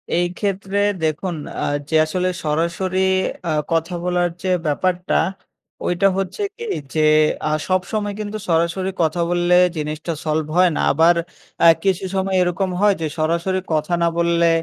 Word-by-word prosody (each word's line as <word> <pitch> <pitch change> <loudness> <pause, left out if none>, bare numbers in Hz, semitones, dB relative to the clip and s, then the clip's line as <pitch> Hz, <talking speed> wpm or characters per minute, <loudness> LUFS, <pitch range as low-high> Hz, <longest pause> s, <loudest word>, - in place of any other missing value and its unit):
এই 175 +1 +2
ক্ষেত্রে 200 -1 -1 0.2
দেখুন 160 +3 -1 0.3
আ - - 0 0.2
যে 160 - 0
আসলে 180 +3 -1
সরাসরি 170 +5 -1 0.5
আ - - +1 0.2
কথা 165 +2 0
বলার 180 0 +1
যে 190 - -1 0.2
ব্যাপারটা। 180 +4 0 0.7
ওইটা 180 +3 +2
হচ্ছে 195 - -3 0.2
কি? 465 - -6 0.3
যে 155 - +1 0.5
আ - - -1 0.2
সবসময় 205 +3 -1
কিন্তু 210 0 -4
সরাসরি 170 +3 +1
কথা 165 +2 0
বললে 175 0 +2 0.2
জিনিসটা 155 +2 -3
সলভ 155 0 0
হয় 180 -1 +5
না। - - 0
আবার 165 +4 +4 0.5
আ - - +9 0.2
কিছু 195 -1 +1
সময় 190 0 0
এরকম 180 +2 0
হয় 205 -1 +4
যে, 160 - 0
সরাসরি 170 +4 0
কথা 155 +2 0
না - - +4
বললে 170 0 +3
175 Hz, 150 wpm, -20 LUFS, 165-190 Hz, 0.7 s, আ